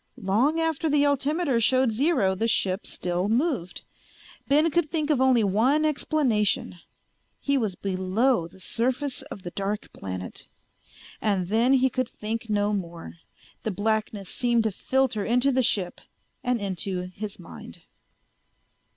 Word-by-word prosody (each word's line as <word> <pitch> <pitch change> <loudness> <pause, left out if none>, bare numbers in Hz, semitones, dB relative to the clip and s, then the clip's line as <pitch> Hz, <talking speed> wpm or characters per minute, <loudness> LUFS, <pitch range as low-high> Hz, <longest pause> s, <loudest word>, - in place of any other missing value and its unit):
Long 240 +12 +1
after 325 -1 0
the 290 0 +3
altimeter 285 -1 +1
showed 255 +1 +3
zero 250 - +2
the 225 +4 -1
ship 195 -3 0
still 180 +2 -2
moved. 240 - 0 0.6
Ben 305 +4 +4
could 330 -1 +1
think 310 -1 0
of 270 -4 +2
only 255 -4 +4
one 240 +10 +3
explanation: 265 - +1 0.6
he 280 - 0
was 220 -8 0
below 190 +3 +1
the 175 - -18
surface 255 +7 -1
of 265 -9 -10
the 175 - -6
dark 200 +2 -4
planet! 95 -1 -6 0.7
And 190 -4 0
then 230 +5 +3
he 260 0 +4
could 255 -1 -1
think 225 +1 -5
no 205 0 +1
more; 170 -4 -5 0.4
the - - -2
blackness 210 -1 -1
seemed 240 -2 +1
to 220 - 0
filter 260 0 0
into 250 +5 +2
the 260 0 +2
ship 195 -7 0 0.4
and 250 -1 +1
into 190 -1 -2
his 200 +4 -7
mind. - - -12
225 Hz, 140 wpm, -26 LUFS, 195-270 Hz, 0.7 s, Ben